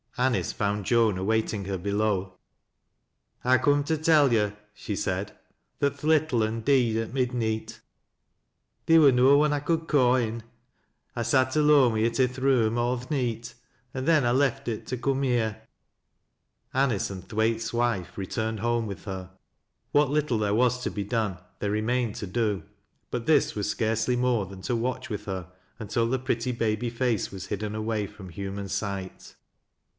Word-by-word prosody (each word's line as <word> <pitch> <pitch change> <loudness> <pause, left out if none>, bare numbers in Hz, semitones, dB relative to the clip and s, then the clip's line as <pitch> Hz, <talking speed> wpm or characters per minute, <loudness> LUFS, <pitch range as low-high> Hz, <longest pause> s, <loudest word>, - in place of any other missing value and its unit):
Anice 125 -1 +1
found 105 -1 -2
Joan 115 -3 +3
awaiting 105 +1 -1
her 95 0 -2
below. 100 -1 -1 0.5
" - - -45
I 130 +1 +5
ha' - - -5
come 145 0 +3
to 160 +1 0
tell 150 -4 +4
yo'," 105 -2 +2 0.2
she 105 0 -5
said, 95 +2 -2 0.3
" - - -49
that 140 0 0
th' - - -17
little 155 -6 +3
ul 110 +1 -1
deed 120 -3 +2
at 115 +1 -3
midneet. 115 -4 -2 1.1
Theer 165 0 +7
wur 145 -3 +7
no 130 +3 +5
one 150 0 +3
I 145 - 0
could 165 +2 -1
ca' 130 -5 +4
in. 115 -2 -1 0.7
I 120 - -2
sat 130 +2 +2
«lone 150 -5 +5
wi' 110 - 0
it 115 +3 0
i' 130 - +6
th' 125 +1 -6
room 120 -4 +2
aw 120 +1 +1
th' 125 +1 -10
neet, 120 -5 -2 0.4
an' 130 0 -3
then 155 -5 +4
I 120 - +3
left 135 +1 +1
it 115 -2 -4
t 125 - -3
^ - - -13
come 135 +1 0
here." 110 -4 0 1.1
Anice 130 -6 +1
and 95 -2 -8
Thwaite's 110 0 0
wife 120 -6 -1
returned 110 +3 -3
home 120 +1 0
with 100 - -8
her. 95 -2 -6 0.6
What 145 -2 +3
little 145 -6 +1
there 105 -1 0
was 125 +1 +2
to - - -2
be 100 - -3
done, 105 -3 -1 0.2
they 100 - -1
remained 110 +2 0
to 105 - -5
do. 105 0 -1 0.5
But 120 -1 -3
this 150 -1 +3
was 105 -1 -2
scarcely 115 +2 0
more 125 -4 +1
than 95 0 -11
to 125 - -1
watch 125 +2 -2
with 105 -1 -5
her 95 -3 -5 0.3
until 115 +1 0
the 130 +1 0
pretty 125 -1 -1
baby 115 0 -1
face 115 -3 -1
was 95 -1 -7
hidden 105 +1 -3
away 110 -1 -2
from 100 -2 -12
human 100 +2 -5
sight. 95 -1 -5
115 Hz, 180 wpm, -26 LUFS, 105-130 Hz, 1.1 s, Theer